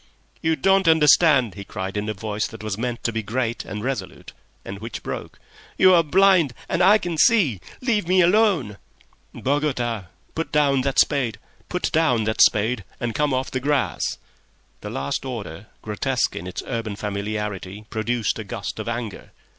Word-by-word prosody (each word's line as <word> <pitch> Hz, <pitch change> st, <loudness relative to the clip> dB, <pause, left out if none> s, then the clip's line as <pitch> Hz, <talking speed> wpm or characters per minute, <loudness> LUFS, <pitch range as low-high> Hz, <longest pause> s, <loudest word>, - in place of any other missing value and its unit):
"You 160 Hz, 0 st, +2 dB
don't 195 Hz, +1 st, +3 dB
understand," 150 Hz, -, +5 dB
he 100 Hz, -, -8 dB
cried, 95 Hz, 0 st, -5 dB
in 105 Hz, +1 st, -2 dB
a 110 Hz, -, -3 dB
voice 105 Hz, +2 st, -3 dB
that 115 Hz, -1 st, -11 dB
was 110 Hz, -2 st, -2 dB
meant 120 Hz, +2 st, -4 dB
to 115 Hz, -, 0 dB
be 110 Hz, -, -1 dB
great 115 Hz, +2 st, -2 dB
and 105 Hz, 0 st, -6 dB
resolute, 125 Hz, -8 st, -5 dB, 0.3 s
and 100 Hz, +1 st, -7 dB
which 115 Hz, +2 st, -7 dB
broke. -, -, -6 dB, 0.4 s
"You 185 Hz, 0 st, +6 dB
are 170 Hz, -, +6 dB
blind 175 Hz, -3 st, +4 dB
and -, -, 0 dB
I 200 Hz, +4 st, +7 dB
can 175 Hz, -6 st, -4 dB
see. 160 Hz, -, +4 dB, 0.2 s
Leave 220 Hz, -8 st, 0 dB
me 185 Hz, +1 st, +3 dB
alone!" 175 Hz, -, +3 dB, 0.5 s
"Bogota! 130 Hz, -7 st, -1 dB, 0.3 s
Put 165 Hz, -, -4 dB
down 145 Hz, -4 st, +3 dB
that 135 Hz, 0 st, -2 dB
spade 135 Hz, -6 st, +2 dB, 0.4 s
and 115 Hz, -, +1 dB
come 150 Hz, +2 st, +1 dB
off 130 Hz, 0 st, -1 dB
the 130 Hz, -, -1 dB
grass!" 140 Hz, +1 st, 0 dB, 0.6 s
The -, -, -7 dB
last 70 Hz, +1 st, -3 dB
order, 105 Hz, -7 st, -6 dB, 0.2 s
grotesque 120 Hz, +4 st, -1 dB
in 90 Hz, -, -6 dB
its 90 Hz, -, -5 dB
urban 115 Hz, -4 st, -3 dB
familiarity, 105 Hz, -1 st, -4 dB
produced 110 Hz, 0 st, -1 dB
a -, -, -4 dB
gust 100 Hz, -, -6 dB
of -, -, -5 dB
anger. 115 Hz, -3 st, -5 dB
120 Hz, 160 wpm, -23 LUFS, 105-155 Hz, 0.6 s, I